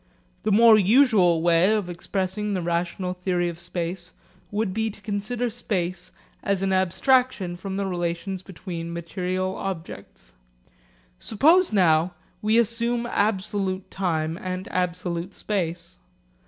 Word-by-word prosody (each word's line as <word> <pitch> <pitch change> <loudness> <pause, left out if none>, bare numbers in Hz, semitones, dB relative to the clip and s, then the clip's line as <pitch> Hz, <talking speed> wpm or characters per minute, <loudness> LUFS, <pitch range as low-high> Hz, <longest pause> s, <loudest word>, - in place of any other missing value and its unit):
The 215 - 0
more 220 +1 +7
usual 200 - +4
way 170 +3 +4
of 210 -4 0
expressing 190 +3 -2
the 185 - -1
relational 175 +2 -1
theory 180 -1 -1
of 170 0 -8
space 175 +1 -5 0.4
would 205 -2 -1
be 220 +1 0
to 215 - -11
consider 215 +4 -2
space 185 -5 -3 0.3
as 200 -1 0
an 190 0 +1
abstraction 190 +1 +2
from 190 +2 -5
the 200 - -1
relations 175 +1 -3
between 170 -3 -7
material 185 +2 -3
objects. 185 -4 -7 0.9
Suppose 325 - +4
now 175 -3 +3 0.3
we 215 +2 +3
assume 235 +1 +1
absolute 200 -3 -1
time 165 -3 -1
and 185 0 -4
absolute 180 0 -2
space. 170 -4 -3
185 Hz, 125 wpm, -24 LUFS, 175-210 Hz, 0.9 s, more